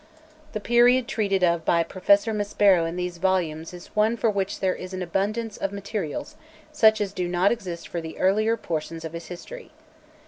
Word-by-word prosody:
The 215 Hz, -, -2 dB
period 240 Hz, +3 st, +4 dB
treated 200 Hz, -4 st, 0 dB
of 170 Hz, -2 st, +2 dB
by 170 Hz, +1 st, +3 dB
Professor 200 Hz, +5 st, +2 dB
Maspero 205 Hz, -4 st, +3 dB
in 165 Hz, -, -6 dB
these 180 Hz, -1 st, -4 dB
volumes 165 Hz, -4 st, 0 dB
is 175 Hz, -1 st, -12 dB
one 215 Hz, +2 st, +2 dB
for 225 Hz, -1 st, +2 dB
which 200 Hz, 0 st, -2 dB
there 190 Hz, -1 st, +1 dB
is 185 Hz, +1 st, -7 dB
an 185 Hz, -, -3 dB
abundance 205 Hz, +5 st, -2 dB
of 195 Hz, -, -2 dB
materials 200 Hz, -5 st, -5 dB, 0.4 s
sucli 220 Hz, -7 st, +5 dB
as 200 Hz, -1 st, -2 dB
do 180 Hz, -2 st, -2 dB
not 180 Hz, +3 st, +2 dB
exist 185 Hz, -8 st, -4 dB
for 170 Hz, -, -4 dB
the 160 Hz, 0 st, -8 dB
earlier 215 Hz, +4 st, +2 dB
portions 165 Hz, -1 st, -4 dB
of 160 Hz, -, -6 dB
his 170 Hz, 0 st, -7 dB
history. 485 Hz, -, -9 dB
190 Hz, 185 wpm, -25 LUFS, 175-215 Hz, 0.4 s, sucli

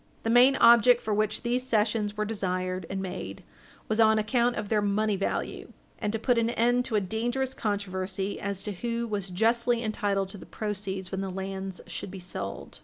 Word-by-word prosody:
The 225 Hz, -, +1 dB
main 250 Hz, +3 st, +7 dB
object 235 Hz, 0 st, +7 dB
for 215 Hz, -, -2 dB
which 215 Hz, 0 st, 0 dB
these 245 Hz, +1 st, +1 dB
cessions 215 Hz, -3 st, 0 dB
were 215 Hz, -, 0 dB
desired 185 Hz, -4 st, -2 dB
and 195 Hz, 0 st, -3 dB
made 180 Hz, -, -6 dB, 0.4 s
was 220 Hz, +1 st, 0 dB
on 220 Hz, -1 st, +6 dB
account 235 Hz, +3 st, +2 dB
of 210 Hz, -, -3 dB
their 215 Hz, -2 st, +2 dB
money 205 Hz, +1 st, +1 dB
value, 195 Hz, -, -3 dB, 0.3 s
and 210 Hz, -, -1 dB
to 225 Hz, -, -1 dB
put 240 Hz, +1 st, +2 dB
an 230 Hz, 0 st, +1 dB
end 245 Hz, +1 st, +2 dB
to 230 Hz, -, -2 dB
a -, -, +5 dB
dangerous 240 Hz, +7 st, -2 dB
controversy 195 Hz, -3 st, -3 dB
as 200 Hz, -1 st, -3 dB
to 210 Hz, -, -3 dB
who 235 Hz, +4 st, -3 dB
was 200 Hz, -3 st, -3 dB
justly 235 Hz, +5 st, +2 dB
entitled 200 Hz, -3 st, -1 dB
to 200 Hz, -, -9 dB
the -, -, -12 dB
proceeds 195 Hz, -3 st, -4 dB
when 190 Hz, 0 st, -2 dB
the 195 Hz, -, -3 dB
lands 190 Hz, 0 st, -5 dB
should -, -, -6 dB
be 195 Hz, -, -8 dB
sold. 170 Hz, -, -6 dB
210 Hz, 195 wpm, -28 LUFS, 195-230 Hz, 0.4 s, main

